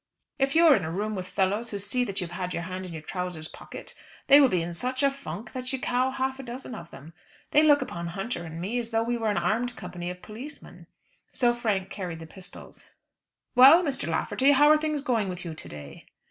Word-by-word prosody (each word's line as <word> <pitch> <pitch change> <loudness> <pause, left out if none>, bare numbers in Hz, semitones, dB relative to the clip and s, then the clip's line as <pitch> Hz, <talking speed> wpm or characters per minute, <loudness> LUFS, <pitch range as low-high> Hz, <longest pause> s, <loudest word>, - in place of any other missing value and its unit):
If 275 +1 +1
you 335 +1 +6
are 305 -4 +8
in 195 - -1
a 160 - -3
room 205 +6 -2
with 185 -2 -4
fellows 205 +4 0
who 205 - -4
see 205 +6 +1
that 195 -3 -4
you 180 - -2
have 180 +1 -4
your 170 - -3
hand 185 +1 -5
in - - -9
your 160 -2 -7
trousers' 180 -3 -4
pocket, - - -9 0.3
they 285 +1 +8
will 275 - +7
be 180 -5 +1
in 170 +1 -5
such 255 +9 -2
a 280 - +4
funk 260 -5 -8
that 255 -1 -3
you 265 - -1
cow 250 +1 +1
half 265 0 -2
a - - -6
dozen 250 +1 -7
of 170 -6 -8
them. 160 +4 -12 0.4
They 300 - +6
look 290 -3 +5
upon 170 -8 -6
Hunter 195 +3 -4
and 165 0 -7
me 210 +8 -2
as 230 -1 -4
though 225 -1 +1
we 240 +1 -1
were 225 -2 0
an 205 - 0
armed 225 +8 0
company 180 -2 -6
of 180 0 -8
policemen." 250 +8 -10 0.5
So 240 -2 +3
Frank 210 -5 -1
carried 180 -5 -5
the 160 - -9
pistols. 185 +3 -11 0.6
"Well, 270 +8 +8
Mr. 275 - -1
Lafferty, 265 +11 +2
how 290 +2 +6
are 305 - +7
things 305 -2 -1
going 230 -8 0
with 180 0 -6
you 165 - -5
to 155 - -9
day?" 75 -1 -10
215 Hz, 240 wpm, -27 LUFS, 180-260 Hz, 0.6 s, are